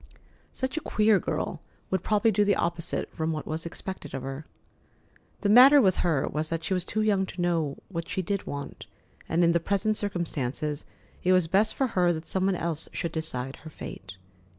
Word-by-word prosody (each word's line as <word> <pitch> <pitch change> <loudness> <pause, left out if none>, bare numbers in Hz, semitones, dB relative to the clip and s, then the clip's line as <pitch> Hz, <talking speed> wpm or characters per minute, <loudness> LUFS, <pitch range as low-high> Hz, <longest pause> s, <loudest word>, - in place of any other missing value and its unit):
Such 260 +3 -3
a - - -1
queer 215 -5 +3
girl - - -3 0.3
would 190 -2 +1
probably 215 +3 +2
do 210 +1 +3
the 205 0 +3
opposite 170 -1 -2
from 160 0 -1
what 155 -1 -4
was 160 +2 -4
expected 170 -4 -6
of 135 - -5
her. 135 +3 -6 0.9
The 205 - +1
matter 260 +6 +9
with 190 -8 +3
her 160 -6 +1
was 155 +1 -2
that 165 0 -2
she 190 - -1
was 180 -2 0
too 215 +3 -1
young 200 -3 +2
to - - -9
know 165 -5 0
what 170 -3 -5
she 190 - -2
did 200 +2 -2
want, 140 0 -6 0.4
and 170 +2 +2
in 170 - +5
the 170 - +3
present 200 +5 0
circumstances 155 -7 -2 0.4
it 185 - +4
was 185 -2 +4
best 200 +6 +2
for 270 - +1
her 180 -7 +2
that 160 0 -6
some 190 +2 0
one 195 - +2
else 165 -2 -2
should 170 - -3
decide 135 -5 -3
her 160 - -11
fate. 95 -9 -9
175 Hz, 200 wpm, -27 LUFS, 160-200 Hz, 0.9 s, matter